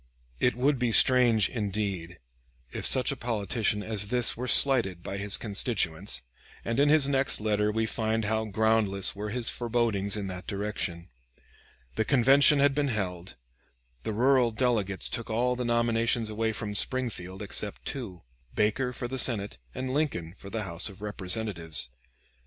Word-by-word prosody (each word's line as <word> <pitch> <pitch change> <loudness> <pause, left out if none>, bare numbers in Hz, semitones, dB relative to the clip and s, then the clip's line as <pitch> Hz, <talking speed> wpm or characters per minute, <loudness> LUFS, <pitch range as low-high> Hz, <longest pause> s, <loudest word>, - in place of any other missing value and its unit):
It 125 - +2
would 135 +2 +1
be 125 -2 0
strange, 120 -3 +5
indeed, 100 -6 -4 0.5
if - - -3
such 130 +2 +2
a - - -3
politician 110 -3 -1
as 105 -2 0
this 125 +2 +4
were 125 +2 -5
slighted 115 -12 +3
by 100 - -5
his 100 0 +3
constituents, 100 - -1 0.4
and 115 +3 -1
in 145 +1 +4
his 150 -2 +4
next 135 -1 +2
letter 105 0 0
we 110 +1 0
find 110 0 -1
how 110 +1 -1
groundless 110 -2 +1
were 105 +1 -5
his 120 +1 0
forebodings 115 -4 0
in 100 - -4
that 90 -1 -7
direction. 100 -4 -4 0.9
The 110 - +2
convention 135 +4 +5
had 140 0 +3
been 145 0 0
held; 95 -7 -4 0.7
the 110 - -4
rural 125 +2 +3
delegates 110 -5 +1
took 115 - -2
all 125 +3 0
the 125 - -3
nominations 115 -1 0
away 110 +1 -1
from 105 -1 -5
Springfield 105 -5 -2
except 100 0 -3
two, 100 - -6 0.3
Baker 110 +5 0
for 120 - -5
the 130 +1 -4
Senate, 105 - +1 0.2
and 130 0 -4
Lincoln 110 - -2
for 100 - -11
the 110 +1 -4
House 85 +1 -3
of 100 +1 -13
Representatives. 90 - -3
110 Hz, 160 wpm, -28 LUFS, 100-125 Hz, 0.9 s, strange